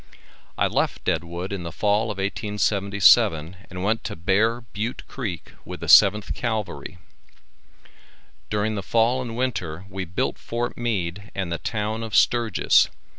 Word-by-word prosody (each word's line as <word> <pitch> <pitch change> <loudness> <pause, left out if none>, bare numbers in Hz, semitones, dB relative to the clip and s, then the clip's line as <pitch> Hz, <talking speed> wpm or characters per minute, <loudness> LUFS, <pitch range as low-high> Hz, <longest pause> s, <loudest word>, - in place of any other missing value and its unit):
I - - +2
left - - -1
Deadwood 85 +3 -2
in 100 - -4
the 85 -1 -6
fall 105 +1 +1
of 105 -3 -4
1877, 100 -4 +2
and 90 0 -6
went 110 +4 0
to 105 - -4
Bear 105 +8 +1
Butte 115 +2 -5
Creek 100 - -6
with - - -8
the - - -4
7th 105 0 +6
Cavalry. 110 -5 -4 1.5
During 105 +1 0
the 100 - -3
fall 115 +5 +2
and 120 -2 -6
winter 95 -9 -3
we 95 0 -4
built 90 +1 -2
Fort 120 +1 -3
Meade 100 -4 -3
and 95 -3 -3
the 85 - -2
town 110 0 -3
of 115 -2 -4
Sturgis. 115 -5 +4
105 Hz, 145 wpm, -24 LUFS, 95-115 Hz, 1.5 s, 7th